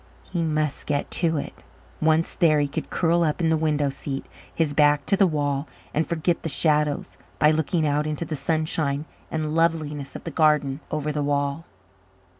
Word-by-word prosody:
He 175 -2 -3
must 155 -3 -1
get 145 -1 -1
to 165 -2 +1
it; - - -4 0.5
once 160 +1 +2
there, 155 -4 +3
he 145 - +1
could 140 - -5
curl 170 0 +2
up 155 0 0
in 165 -2 +2
the - - +4
window 150 -3 +1
seat, 135 0 -5 0.3
his 160 -3 0
back 145 -1 +4
to - - +3
the 195 -1 +4
wall, 145 -2 -1 0.3
and 155 +2 0
forget 170 +1 0
the 160 - -3
shadows 150 0 +1 0.2
by 150 - +5
looking 160 +1 +1
out 150 +1 +1
into 155 +2 -1
the 155 - -3
sunshine 155 -1 -1 0.2
and 155 -1 -2
loveliness 155 -4 0
of - - -7
the 165 - -5
garden 150 -3 +2
over 150 0 -2
the 150 0 -2
wall. 145 +2 -1
155 Hz, 185 wpm, -24 LUFS, 145-160 Hz, 0.5 s, by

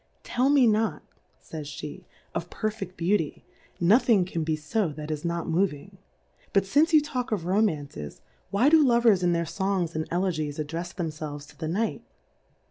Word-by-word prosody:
Tell 255 +3 +1
me 280 -3 +5
not, 220 0 +1 0.5
[ays 155 -2 -5
Jbe^ 150 0 -8 0.3
of - - -4
perfeft 215 -4 -4
Beauty, 170 -2 0 0.3
nothing 205 +1 +4
can 170 -3 -3
be 155 0 0
fo 175 +5 -1
that 150 +1 -6
is 150 -1 -3
not 170 -1 -2
moving. 185 +1 -1 0.5
But 195 - +4
fmce 295 - +3
you 310 - +8
talk 255 -4 -3
of 195 -6 -1
Romances, 155 - -1 0.3
why 220 +7 +3
do 315 -1 +6
Lovers 235 -6 +4
in 175 -1 +2
their 170 0 0
Songs 180 0 -1
and 160 0 -2
Elegies 165 -5 -1
addrefs 165 +4 -4
them 170 -4 -2
felves 150 -2 -7
to - - -17
the 160 - -5
Night 210 +8 -1
180 Hz, 170 wpm, -27 LUFS, 155-215 Hz, 0.5 s, you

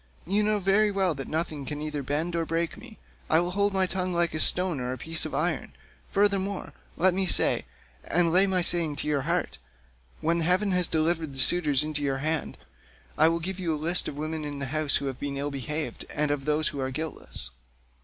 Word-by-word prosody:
You 200 +5 +2
know 210 0 +2
very 200 +2 +3
well 195 -3 +1
that 135 -2 -6
nothing 155 -2 -2
can 145 +2 -5
either 150 -1 -3
bend 150 +6 -1
or 165 - +1
break 165 +1 -1
me. 240 -3 -13 0.3
I 160 - +5
will 175 +1 -1
hold 200 +2 +1
my 190 -1 +2
tongue 185 0 -2
like 170 -1 +1
a 155 - -2
stone 180 -2 +4
or 125 0 -2
a - - -6
piece 165 +3 -1
of - - -6
iron; - - -1 0.4
furthermore 200 -1 0 0.2
let 185 +1 +4
me 190 0 +1
say, - - +2 0.4
and 170 -1 +2
lay 190 +2 +6
my 185 -2 +1
saying 170 -4 +2
to 145 - -3
your 145 -2 +1
heart, 175 +1 -1 0.6
when 170 +2 +1
heaven 185 +5 +2
has 180 -2 +2
delivered 160 -2 0
the - - -6
suitors 150 +1 +4
into 150 -1 -2
your 135 -2 0
hand, 155 +2 -2 0.6
I 155 - +5
will 165 +1 +1
give 185 +3 -4
you 165 -4 0
a - - -4
list 170 +4 +1
of - - -5
the 145 - -5
women 155 0 -3
in 145 -1 -4
the 140 - -3
house 155 -2 +1
who - - 0
have 135 -2 -4
been 140 -1 -4
ill 145 +1 -2
behaved, 150 +3 -3
and 150 -1 0
of 140 -2 -2
those 150 +1 +1
who 145 - -6
are 130 0 -1
guiltless." 155 - -5
160 Hz, 225 wpm, -27 LUFS, 150-180 Hz, 0.6 s, lay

